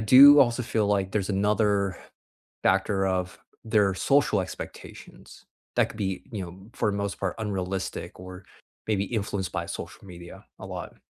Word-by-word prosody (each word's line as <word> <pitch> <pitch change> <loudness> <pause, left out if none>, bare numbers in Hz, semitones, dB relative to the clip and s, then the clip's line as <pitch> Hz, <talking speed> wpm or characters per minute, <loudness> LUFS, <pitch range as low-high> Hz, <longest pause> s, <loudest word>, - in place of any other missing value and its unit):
do 140 +6 +9
also 125 -1 +3
feel 110 -2 0
like 100 -2 0
there's 100 -1 -1
another 100 -1 +1 0.7
factor 95 +1 +2
of 90 -1 -2 0.3
their 105 -4 +2
social 135 -2 +2
expectations 90 0 -9 0.3
that - - +3
could 110 - -11
be, 95 -2 -3
you 100 -4 -3
know, 95 +4 -12
for 105 - +1
the 100 - -3
most 100 -1 -3
part 95 -2 -1
unrealistic 95 -4 -4
or 90 0 -10 0.4
maybe 100 -2 +1
influenced 100 -3 -3
by 85 -2 -3
social - - -7
media 85 -1 -11
a - - -8
lot. - - -7
100 Hz, 155 wpm, -26 LUFS, 95-105 Hz, 0.7 s, do